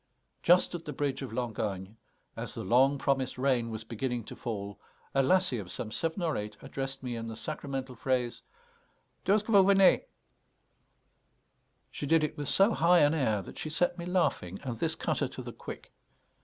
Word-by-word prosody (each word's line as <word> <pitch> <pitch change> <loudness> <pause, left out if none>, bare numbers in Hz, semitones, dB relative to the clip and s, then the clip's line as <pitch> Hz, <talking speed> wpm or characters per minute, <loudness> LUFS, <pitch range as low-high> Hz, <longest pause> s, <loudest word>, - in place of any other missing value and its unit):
Just 180 +1 +4
at 170 -1 -5
the 150 - -4
bridge 140 0 -1
of 135 - -5
Langogne, 105 -4 -3 0.4
as - - -6
the - - -4
long 130 +7 +4
promised 135 -2 0
rain 125 -3 +1
was 110 -1 -5
beginning 120 +2 -3
to - - -9
fall, 100 -4 -5 0.3
a 135 - +4
lassie 140 -3 +3
of 95 -3 -7
some 110 +3 -4
seven 165 - -2
or 160 -3 +1
eight 105 0 -5
addressed 135 0 -4
me 125 -2 -3
in 115 0 -5
the 110 - -5
sacramental 135 -1 -4
phrase, 125 -1 -1 0.9
"D'où 195 - +6
'st 210 - -2
ce - - -22
que 225 - -1
vous 195 -1 +7
venez?" 195 -1 +6 1.9
She 145 - -5
did 160 +1 +4
it 155 - -1
with 145 -2 -4
so 200 +4 +4
high 175 0 +5
an 145 +1 +5
air 110 -10 +1
that - - -10
she 155 - -3
set 175 +3 0
me 170 - -5
laughing, 170 - 0
and 125 -3 -3
this - - 0
cut - - -1
her - - +1
to - - -8
the - - -7
quick. - - -9
135 Hz, 195 wpm, -30 LUFS, 115-160 Hz, 1.9 s, vous